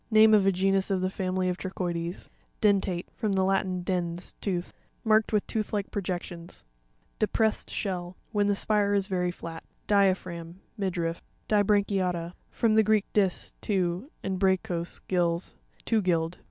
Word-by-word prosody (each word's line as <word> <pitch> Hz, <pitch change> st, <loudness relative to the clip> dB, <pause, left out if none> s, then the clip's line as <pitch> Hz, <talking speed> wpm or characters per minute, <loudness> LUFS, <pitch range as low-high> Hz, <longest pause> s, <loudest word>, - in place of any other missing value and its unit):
Name 220 Hz, -1 st, +7 dB
of 200 Hz, -2 st, +5 dB
a -, -, +6 dB
genus 195 Hz, +1 st, +2 dB
of 190 Hz, -2 st, +1 dB
the 185 Hz, 0 st, 0 dB
family 185 Hz, -1 st, -1 dB
of 180 Hz, 0 st, -1 dB
Trochoides. 175 Hz, -2 st, -3 dB, 0.3 s
Den'rateE.— 195 Hz, -4 st, +2 dB
From 215 Hz, -4 st, -1 dB
the 190 Hz, -1 st, +2 dB
Latin, 190 Hz, -1 st, 0 dB
dens, 175 Hz, -1 st, -2 dB
tooth. 180 Hz, -3 st, -2 dB, 0.3 s
Marked 220 Hz, -1 st, +3 dB
with 210 Hz, -2 st, +1 dB
tooth 220 Hz, -2 st, -3 dB
like 205 Hz, -1 st, -2 dB
projections. 175 Hz, -3 st, -5 dB, 0.5 s
DEPRESSED 220 Hz, 0 st, +1 dB
SHELL.—Whien 190 Hz, +2 st, -2 dB
the 205 Hz, -, +2 dB
spire 205 Hz, 0 st, +2 dB
is 200 Hz, -1 st, +2 dB
very 180 Hz, -2 st, 0 dB
flat. 165 Hz, -2 st, -7 dB, 0.2 s
Di'aruracm. 185 Hz, -4 st, +1 dB, 0.2 s
—Midriff. 175 Hz, -5 st, -2 dB, 0.3 s
Di'srancuta'tTa. 195 Hz, -4 st, +1 dB
— -, -, -40 dB
From 225 Hz, -2 st, +1 dB
the 220 Hz, -, +6 dB
Greek, 215 Hz, -1 st, +3 dB
dis, 195 Hz, -4 st, +1 dB
two, 185 Hz, +4 st, -1 dB
and 190 Hz, -1 st, -2 dB
bragchos, 180 Hz, -3 st, +1 dB
gills—two 175 Hz, +5 st, -1 dB
gilled. 170 Hz, -2 st, 0 dB
190 Hz, 145 wpm, -28 LUFS, 175-205 Hz, 0.5 s, Name